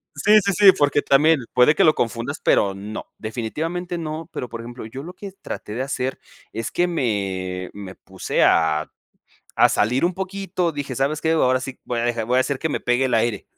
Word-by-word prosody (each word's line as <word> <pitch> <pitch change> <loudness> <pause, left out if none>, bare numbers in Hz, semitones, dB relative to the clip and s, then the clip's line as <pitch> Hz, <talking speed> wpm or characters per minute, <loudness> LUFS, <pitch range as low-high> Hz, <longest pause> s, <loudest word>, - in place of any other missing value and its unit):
Sí, 215 +1 +5
sí, 200 - +2
sí, 205 -2 +8
porque, 145 0 +2
también 150 +3 +4
puede 125 +4 +5
que - - +3
lo 155 - +5
confundas, 120 +5 -2
pero 100 -1 +3
no. 105 +3 -7
Definitivamente 160 +11 -4
no, 160 0 -5
pero 125 - -5
por 115 -1 -7
ejemplo, 120 0 -9
yo 120 +5 -8
lo 175 +5 -9
que 195 +1 -9
traté 105 - -7
de 125 - -3
hacer, 130 -1 -3 0.3
es 115 0 -3
que 175 - +1
me 95 - -2
me 95 -2 -9
puse - - -2
a 80 -1 +2 0.7
a - - +7
salir 125 +9 +1
un 180 - 0
poquito, 190 -2 -2
dije: 140 -3 -5
"¿Sabes 140 +4 0
qué? 160 +1 0
Ahora 130 -5 +3
sí, 130 0 -7
voy 120 -1 -3
a - - -1
dejar 120 -2 -1
voy 125 +3 +1
a - - +5
hacer 135 +1 0
que 160 - -2
me - - -2
pegue 120 +2 +1
el 125 - +1
aire". 115 -2 0
130 Hz, 210 wpm, -22 LUFS, 115-160 Hz, 0.7 s, sí